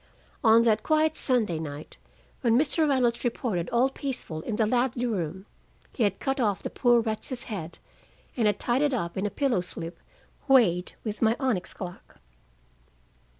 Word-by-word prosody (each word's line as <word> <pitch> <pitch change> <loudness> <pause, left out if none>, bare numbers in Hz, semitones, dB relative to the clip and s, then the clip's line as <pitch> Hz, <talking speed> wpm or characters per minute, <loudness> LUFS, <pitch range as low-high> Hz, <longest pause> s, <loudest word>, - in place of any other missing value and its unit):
On 230 0 +6
that 220 -2 +3
quiet 315 0 +2
Sunday 220 - +1
night, 150 -1 -7 0.4
when 235 -2 +3
Mr. 305 +2 +2
Reynolds 245 -4 +1
reported 225 -8 -1
all 240 +2 +3
peaceful 250 - -5
in 215 - -3
the 220 - +2
Ladley 245 +2 +1
room, 190 -4 -3 0.5
he - - -5
had 205 -3 +1
cut 270 0 -1
off 210 -6 0
the - - -4
poor 240 -2 +3
wretch's 225 +3 -3
head 175 -7 -6 0.6
and 230 -4 +2
had 210 - +1
tied 245 +3 +1
it 290 -3 +2
up 170 -7 -3
in 195 +2 -1
a - - -2
pillow 240 -2 0
slip 170 -1 -7 0.5
weighted 200 -10 +4
with 215 -2 -4
my 225 0 +4
onyx 240 -10 -1
clock! 180 -2 -9
230 Hz, 165 wpm, -27 LUFS, 190-255 Hz, 0.6 s, On